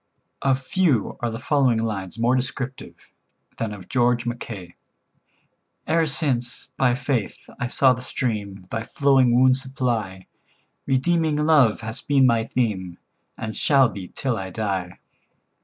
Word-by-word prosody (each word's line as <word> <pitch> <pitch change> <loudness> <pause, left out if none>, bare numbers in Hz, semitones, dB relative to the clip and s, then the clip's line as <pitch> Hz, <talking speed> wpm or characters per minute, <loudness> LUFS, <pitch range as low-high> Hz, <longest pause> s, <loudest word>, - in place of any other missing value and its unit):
Of 135 0 +1
few 150 - +1
are 120 - -1
the 115 - -5
following 130 -2 +2
lines 105 -3 -3
more 120 +2 +2
descriptive 130 0 -5 0.5
than 115 -2 -2
of 100 -3 -9
George 120 -2 +1
Mackay: 110 -7 -6 1.1
"E'er 165 0 +2
since, 130 -4 -1
by 130 -2 +2
faith, 130 -5 -3
I 120 - -1
saw 130 +1 +4
the 125 - -6
stream 105 -7 -3
Thy 110 - -2
flowing 130 -1 +3
wounds 130 0 +4
supply, 120 -9 -3 0.6
Redeeming 155 +3 +2
love 150 -8 +4
has 110 0 -4
been 140 -2 +3
my 115 -2 +3
theme, 95 -9 -2 0.4
And 110 -1 -5
shall 135 -4 +4
be 95 -2 -8
till 130 +2 -2
I 95 -2 -5
die. 95 -3 -3
120 Hz, 140 wpm, -23 LUFS, 110-135 Hz, 1.1 s, saw